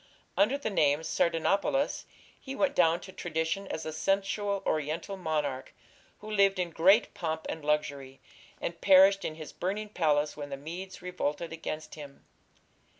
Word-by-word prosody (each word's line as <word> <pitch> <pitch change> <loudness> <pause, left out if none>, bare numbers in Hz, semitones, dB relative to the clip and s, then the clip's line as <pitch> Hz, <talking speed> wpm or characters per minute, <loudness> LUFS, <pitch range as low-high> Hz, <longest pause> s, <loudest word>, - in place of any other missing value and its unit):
Under 215 +8 +3
the 250 -6 -3
name 150 -5 +3
Sardanapalus 185 - +1 0.3
he 270 0 -7
went 285 0 +1
down 165 -7 +3
to 190 - -10
tradition 170 +3 -2
as 160 - -4
a 155 - -4
sensual 195 +3 0
Oriental 155 +6 -1
monarch 150 -7 -3 0.5
who 215 +1 -8
lived 200 -2 +4
in 180 -2 -1
great 195 +8 +4
pomp 160 -2 -3
and 160 - -5
luxury, 140 -3 -1 0.4
and 170 0 -5
perished 195 +1 +6
in 155 - -3
his 155 -1 -9
burning 210 +4 -3
palace 150 -6 +1
when 145 -1 -6
the 140 - -5
Medes 175 +6 -8
revolted 170 -2 -3
against 155 -1 -6
him. 145 -3 -11
170 Hz, 150 wpm, -29 LUFS, 155-195 Hz, 0.5 s, perished